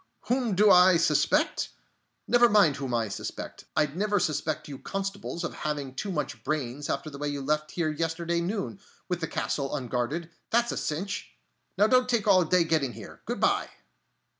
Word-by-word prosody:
Whom 245 -5 +1
do 205 +2 +6
I 180 0 +7
suspect? 165 0 +2 0.6
Never 240 -1 +5
mind 200 -9 +5
whom 135 -2 -4
I 115 -2 +1
suspect. 100 - -6
I'd 150 -1 +1
never 205 +2 +1
suspect 155 -1 -1
you 140 -2 -8
constables 195 -2 -4
of - - -3
having 145 -3 -3
too 195 +9 -4
much 150 -4 -3
brains 145 -2 -3
after 140 +3 -2
the 140 - -9
way 145 - -2
you 145 -1 -3
left 150 +2 0
here 160 -2 -1
yesterday 165 +2 -1
noon, 195 +2 -3 0.3
with 180 -2 -2
the 160 - -1
castle 140 -1 -2
unguarded, 135 +6 -2 0.2
that's 235 +1 +2
a - - -4
cinch!... 195 +7 -3 0.5
Now 205 - +5
don't 255 +2 +3
take 230 -4 +1
all 185 -3 +6
day 175 +2 +3
getting 155 -6 0
here. 110 -1 -11
Good - - -2
by!" - - +2
165 Hz, 180 wpm, -28 LUFS, 145-195 Hz, 0.6 s, I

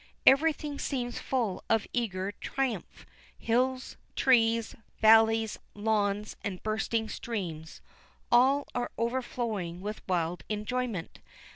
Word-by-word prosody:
Everything 295 0 +4
seems 245 -3 -2
full 235 -8 -1
of 225 -2 +3
eager 200 -5 -1
triumph. 265 +4 -4 0.3
Hills, 255 +3 0 0.2
trees, 230 -3 +3 0.2
valleys, 225 0 +5 0.2
lawns, 210 -1 0
and 185 -3 -4
bursting 220 +1 -1
streams, 170 -10 -5 0.5
all 265 +4 +5
are 245 0 -1
overflowing 230 -7 -2
with 210 +3 -5
a - - -25
wild 175 -1 -1
enjoyment. 215 -3 -3
225 Hz, 105 wpm, -29 LUFS, 205-250 Hz, 0.5 s, valleys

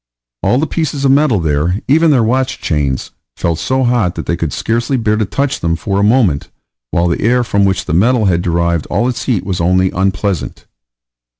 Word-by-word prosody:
All 125 - +2
the 150 - +1
pieces 150 -4 -2
of 135 - +4
metal 135 -6 +3
there, 80 +4 0
even 160 +4 +4
their 130 -6 +3
watch 130 +3 0
chains, 70 -5 -2 0.3
felt 85 -1 -1
so 130 0 0
hot 120 -8 +1
that - - -5
they 85 - -1
could 85 -3 -3
scarcely 120 - -1
bear 110 -3 +1
to 110 0 0
touch 140 +7 -2
them 85 0 0
for 100 +3 -2
a - - +2
moment, 105 - +2 0.4
while 85 +6 +1
the 85 - -1
air 125 +3 +2
from 100 -3 +1
which 95 -1 0
the - - -3
metal 110 +6 +3
had 85 -3 +2
derived 85 -2 0
all 110 +7 0
its 125 - -3
heat 105 -8 -1
was 90 -3 -2
only 90 +2 +2
unpleasant. 95 -1 -2
100 Hz, 205 wpm, -15 LUFS, 85-125 Hz, 0.4 s, of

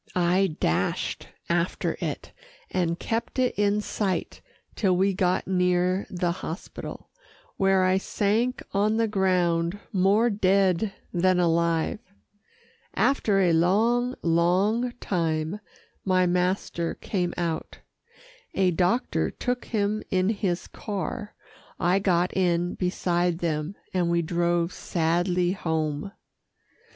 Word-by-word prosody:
I 180 -1 +2
dashed 85 +4 -1 0.2
after 170 +1 0
it, - - -4 0.4
and 170 -2 0
kept 225 +8 -3
it 255 -1 +2
in 205 0 +2
sight 200 -3 -2 0.3
till 185 -4 +2
we 195 +1 +2
got 185 -1 +1
near 180 0 +1
the 175 -1 -1
hospital, 170 +1 -7 0.5
where 195 -1 +3
I 185 +1 +3
sank 220 +6 0
on 210 +2 +2
the 225 0 +2
ground, 180 -3 +1
more 205 +5 +3
dead 195 0 +2 0.2
than 185 0 +3
alive. 170 +1 +1 1.0
After 210 -8 +2
a 175 -3 +3
long, 230 +9 +2
long 185 +8 +2
time 165 -3 -2 0.4
my 185 -1 +3
master 180 -1 0
came 180 -4 -2
out. 165 -2 -3 0.8
A 190 -1 +3
doctor 180 +8 +1
took 250 -1 -3
him 215 -1 -1
in 185 +1 +2
his 195 -5 -1
car, 205 +1 -5 0.4
I 180 +3 +3
got 180 -2 +1
in 175 -1 +1
beside 175 -1 0
them, 160 +1 -2 0.2
and 180 -2 +1
we 170 0 +2
drove 170 +1 0
sadly 175 +2 0
home. 160 -2 -2
185 Hz, 115 wpm, -26 LUFS, 170-200 Hz, 1.0 s, where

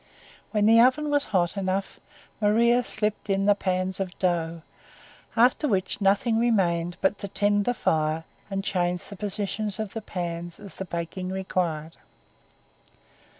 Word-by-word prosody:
When 210 -2 +1
the 225 +1 +7
oven 290 +5 +3
was 290 -1 +2
hot 175 -3 +1
enough, 195 0 -2 0.4
Maria 235 +4 +4
slipped 210 -2 -2
in 195 0 +1
the 205 - +6
pans 185 -1 -1
of 190 -1 -4
dough; 170 -3 -1 0.7
after 250 +6 +4
which 195 -3 -1
nothing 205 +4 +3
remained 175 -7 +1
but 195 +1 +1
to 200 - -4
tend 205 +1 +1
the 245 - +1
fire 155 -3 0 0.3
and 195 -1 -2
change 180 -2 0
the 200 - -9
position 205 +1 -2
of 215 -3 -4
the 225 - -4
pans 175 -3 -5
as 200 - -10
the 190 - -4
baking 170 +2 -4
required. 175 -4 -2
195 Hz, 150 wpm, -26 LUFS, 175-215 Hz, 0.7 s, the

